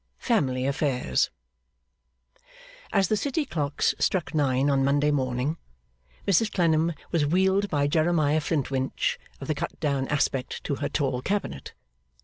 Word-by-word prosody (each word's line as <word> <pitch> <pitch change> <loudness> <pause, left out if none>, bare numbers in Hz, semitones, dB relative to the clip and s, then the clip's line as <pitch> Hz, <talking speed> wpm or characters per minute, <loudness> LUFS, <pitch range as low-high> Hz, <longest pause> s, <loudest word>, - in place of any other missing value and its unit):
Family 130 - 0
Affairs 140 -2 +1 1.6
As 195 -2 +3
the 215 - +2
city 285 +7 -1
clocks 145 - 0
struck 170 -7 0
nine 135 -3 +2
on 135 -1 +2
Monday 145 +2 +2
morning, 130 +2 -1 0.7
Mrs 205 +3 +3
Clennam 165 -2 +2 0.2
was 155 -4 +2
wheeled 190 +4 +2
by 145 -1 +1
Jeremiah 155 0 +2
Flintwinch 135 -4 -1 0.2
of - - -7
the - - +1
cut - - -5
down 140 -2 0
aspect 135 -3 -1
to 140 - -2
her - - -2
tall 135 -4 -1
cabinet. 205 +8 -3
145 Hz, 130 wpm, -26 LUFS, 135-175 Hz, 1.6 s, As